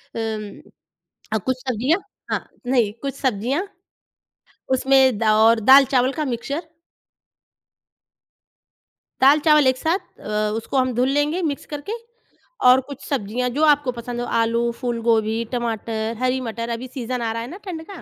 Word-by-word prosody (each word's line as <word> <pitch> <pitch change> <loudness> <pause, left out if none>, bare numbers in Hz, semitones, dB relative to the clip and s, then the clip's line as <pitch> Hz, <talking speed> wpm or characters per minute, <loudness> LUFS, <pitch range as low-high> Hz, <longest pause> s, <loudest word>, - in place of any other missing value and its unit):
अम, 220 -2 -4 0.7
अ, - - +3
कुछ 260 +5 -1
सब्ज़ियाँ 255 - +1 0.3
हाँ, - - -2 0.2
नहीं, 245 -5 +2
कुछ 275 -1 -3
सब्ज़ियाँ, 260 - -1 1.1
उसमें 260 -3 +4
दा 215 -1 +3
और 225 0 +5
दाल-चावल 260 +1 +5
का 305 +2 -2
मिक्सचर। 270 +4 -3 2.6
दाल-चावल 295 +1 +5
एक 260 0 +2
साथ 330 +7 0 0.2
अ, 210 0 -1
उसको 230 +4 -3
हम 255 -1 +2
धुल 250 +3 +1
लेंगे 290 +5 +1
मिक्स 295 -5 -3
करके, 295 +6 -6 0.7
और 250 +1 +7
कुछ 280 -1 -9
सब्ज़ियाँ 250 -1 -1
जो 310 - +2
आपको 290 -3 +3
पसंद 240 0 -6
हों, 245 - -3
आलू, 230 +1 +1
फूलगोभी, 230 -2 0
टमाटर, 225 -1 -2
हरी 255 +1 +1
मटर, 230 -1 -4
अभी 235 +2 -4
सीज़न 250 -1 -4
आ 225 -1 -1
रहा 230 - -3
है 235 - -6
ना 350 - -8
ठंड 335 -4 -6
का, 380 - -9
250 Hz, 145 wpm, -22 LUFS, 230-275 Hz, 2.6 s, और